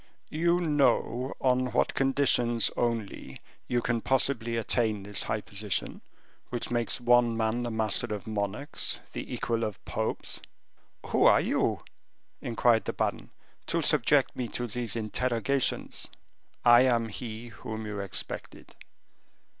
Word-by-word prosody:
"You 170 Hz, +3 st, +2 dB
know 135 Hz, -5 st, +1 dB
on 125 Hz, -1 st, +1 dB
what -, -, +2 dB
conditions 130 Hz, -4 st, +3 dB
only 115 Hz, -, -3 dB, 0.3 s
you 120 Hz, -1 st, 0 dB
can 120 Hz, -1 st, 0 dB
possibly 120 Hz, -3 st, +1 dB
attain 110 Hz, -2 st, 0 dB
this 100 Hz, 0 st, 0 dB
high 110 Hz, -1 st, -1 dB
position, 105 Hz, -2 st, -3 dB, 0.5 s
which 120 Hz, -1 st, -4 dB
makes 120 Hz, +1 st, +1 dB
one 120 Hz, -1 st, +4 dB
man 110 Hz, +1 st, 0 dB
the 120 Hz, -, -2 dB
master 110 Hz, +1 st, 0 dB
of 105 Hz, -2 st, -4 dB
monarchs, 105 Hz, +5 st, -2 dB
the -, -, -6 dB
equal 115 Hz, -1 st, -1 dB
of 105 Hz, -4 st, -5 dB
popes?" -, -, -3 dB, 0.7 s
"Who -, -, +3 dB
are -, -, +7 dB
you," -, -, 0 dB, 0.6 s
inquired 115 Hz, -1 st, +2 dB
the -, -, -2 dB
baron, -, -, -2 dB, 0.4 s
"to -, -, 0 dB
subject -, -, +3 dB
me 125 Hz, -, -3 dB
to 120 Hz, -, -4 dB
these 120 Hz, -1 st, -4 dB
interrogations?" 120 Hz, +4 st, -1 dB, 0.6 s
"I 120 Hz, 0 st, +8 dB
am 120 Hz, -3 st, +2 dB
he 115 Hz, +1 st, -7 dB
whom 110 Hz, -1 st, -7 dB
you 105 Hz, -1 st, -4 dB
expected." 100 Hz, -2 st, -6 dB
120 Hz, 130 wpm, -28 LUFS, 110-125 Hz, 0.7 s, I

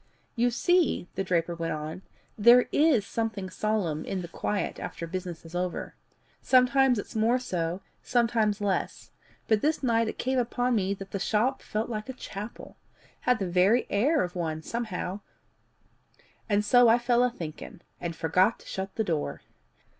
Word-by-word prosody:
"You 240 Hz, 0 st, +3 dB
see," 350 Hz, -, +2 dB
the 195 Hz, -, -2 dB
draper 175 Hz, -2 st, 0 dB
went 165 Hz, -1 st, -3 dB
on, 155 Hz, +3 st, -5 dB, 0.3 s
"there 240 Hz, +3 st, +6 dB
IS 290 Hz, -9 st, +3 dB
something 215 Hz, -5 st, -3 dB
solemn 195 Hz, -8 st, -1 dB
in 185 Hz, -2 st, -3 dB
the -, -, -6 dB
quiet 200 Hz, +4 st, -3 dB
after 170 Hz, -, -5 dB
business 175 Hz, -1 st, -6 dB
is 165 Hz, -, -12 dB
over. 180 Hz, 0 st, -3 dB, 0.5 s
Sometimes 260 Hz, 0 st, +4 dB
it's 205 Hz, -, -6 dB
more 225 Hz, +3 st, +3 dB
so, 180 Hz, -7 st, -3 dB, 0.2 s
sometimes 225 Hz, -3 st, +1 dB
less; 200 Hz, -2 st, -2 dB, 0.4 s
but 215 Hz, -2 st, +3 dB
this 305 Hz, 0 st, 0 dB
night 230 Hz, -2 st, +2 dB
it -, -, -4 dB
came 260 Hz, 0 st, 0 dB
upon 245 Hz, +1 st, 0 dB
me 200 Hz, -3 st, +1 dB
that 195 Hz, 0 st, -10 dB
the 200 Hz, -, -3 dB
shop 230 Hz, +7 st, +1 dB
felt 215 Hz, +1 st, -3 dB
like 215 Hz, 0 st, -5 dB
a -, -, -3 dB
chapel 210 Hz, -3 st, -8 dB, 0.5 s
had 250 Hz, -, +5 dB
the 195 Hz, -, -2 dB
very 185 Hz, +7 st, +3 dB
air 285 Hz, +10 st, +3 dB
of 180 Hz, 0 st, -5 dB
one 160 Hz, -2 st, -3 dB
somehow, 205 Hz, -4 st, -4 dB, 1.3 s
and 205 Hz, 0 st, +2 dB
so 245 Hz, +3 st, +6 dB
I 230 Hz, -, +6 dB
fell 240 Hz, 0 st, +2 dB
a 250 Hz, -, +3 dB
thinking, 165 Hz, -6 st, -8 dB, 0.2 s
and 170 Hz, -1 st, -4 dB
forgot 180 Hz, +7 st, +2 dB
to -, -, -17 dB
shut 190 Hz, 0 st, -5 dB
the 220 Hz, -, 0 dB
door. 155 Hz, -, -2 dB
210 Hz, 170 wpm, -28 LUFS, 180-240 Hz, 1.3 s, there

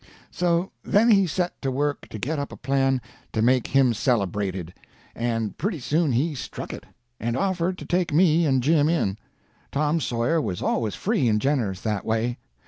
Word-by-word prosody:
So 175 Hz, +1 st, 0 dB
then 225 Hz, +4 st, +4 dB
he 195 Hz, -3 st, +5 dB
set 175 Hz, +2 st, -2 dB
to 135 Hz, -, -1 dB
work 145 Hz, +2 st, -2 dB
to -, -, -6 dB
get 145 Hz, +8 st, -2 dB
up 140 Hz, -, -4 dB
a -, -, -9 dB
plan 135 Hz, 0 st, +1 dB, 0.3 s
to 110 Hz, -, 0 dB
make 125 Hz, 0 st, +3 dB
him 130 Hz, -3 st, +3 dB
celebrated; 100 Hz, -, -1 dB, 0.4 s
and 115 Hz, -2 st, -2 dB
pretty 180 Hz, -1 st, -1 dB
soon 150 Hz, +2 st, +1 dB
he 150 Hz, +7 st, +1 dB
struck 135 Hz, -, -6 dB
it, -, -, -9 dB, 0.3 s
and 120 Hz, +2 st, -1 dB
offered 185 Hz, -2 st, 0 dB
to -, -, -8 dB
take 175 Hz, 0 st, 0 dB
me 165 Hz, 0 st, +4 dB
and 130 Hz, -3 st, +2 dB
Jim 150 Hz, +1 st, +3 dB
in. 105 Hz, -, 0 dB, 0.5 s
Tom 150 Hz, +3 st, +1 dB
Sawyer 120 Hz, +4 st, 0 dB
was 90 Hz, -10 st, -3 dB
always 110 Hz, -3 st, -1 dB
free 200 Hz, -, +1 dB
and 105 Hz, -1 st, +3 dB
generous 115 Hz, -8 st, 0 dB
that 105 Hz, -3 st, -2 dB
way. 115 Hz, +2 st, -1 dB
135 Hz, 180 wpm, -24 LUFS, 115-165 Hz, 0.5 s, he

